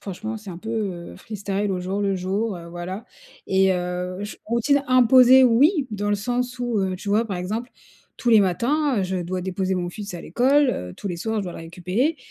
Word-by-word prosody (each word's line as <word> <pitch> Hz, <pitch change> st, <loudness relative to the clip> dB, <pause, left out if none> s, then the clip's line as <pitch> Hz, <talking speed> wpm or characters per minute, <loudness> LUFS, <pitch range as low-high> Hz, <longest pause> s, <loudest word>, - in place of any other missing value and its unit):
franchement, 215 Hz, +3 st, -5 dB
c'est 210 Hz, -2 st, -9 dB
un 170 Hz, -, -8 dB
peu, 220 Hz, +5 st, -9 dB
heu, 195 Hz, -6 st, -4 dB
freestyle 200 Hz, -1 st, -3 dB
au 180 Hz, -, -2 dB
jour 190 Hz, +3 st, -2 dB
le 195 Hz, -1 st, +1 dB
jour, 195 Hz, +4 st, -1 dB
heu, 170 Hz, -, -10 dB
voilà 175 Hz, +5 st, -6 dB, 0.4 s
et 190 Hz, 0 st, +3 dB
heu, 180 Hz, 0 st, -3 dB
j 205 Hz, -, -6 dB
routine 235 Hz, +5 st, +2 dB
imposée 255 Hz, +1 st, +7 dB
oui, 275 Hz, -, +4 dB
dans 205 Hz, 0 st, -2 dB
le 205 Hz, -, +2 dB
sens 245 Hz, +4 st, -2 dB
où, 240 Hz, -3 st, -1 dB
heu, 190 Hz, -1 st, 0 dB
tu 200 Hz, -, -8 dB
vois, 210 Hz, +3 st, +3 dB
par 195 Hz, -5 st, -4 dB
exemple, 215 Hz, +7 st, -4 dB, 0.5 s
tous 240 Hz, -, -2 dB
les 220 Hz, -2 st, +7 dB
matins, 245 Hz, -, +1 dB
heu, -, -, +1 dB
je 190 Hz, 0 st, -2 dB
dois 180 Hz, +2 st, -3 dB
déposer 190 Hz, +1 st, -2 dB
mon 175 Hz, -1 st, -2 dB
fils 200 Hz, +2 st, -7 dB
à 175 Hz, -, -6 dB
l'école, 270 Hz, -, +3 dB
heu, 90 Hz, 0 st, -5 dB
tous 200 Hz, -, -6 dB
les 175 Hz, -, -3 dB
soirs 220 Hz, +5 st, -2 dB
je 205 Hz, -, -2 dB
dois 180 Hz, -, -5 dB
le -, -, -9 dB
récupérer. 180 Hz, -, -1 dB
205 Hz, 225 wpm, -23 LUFS, 185-235 Hz, 0.5 s, imposée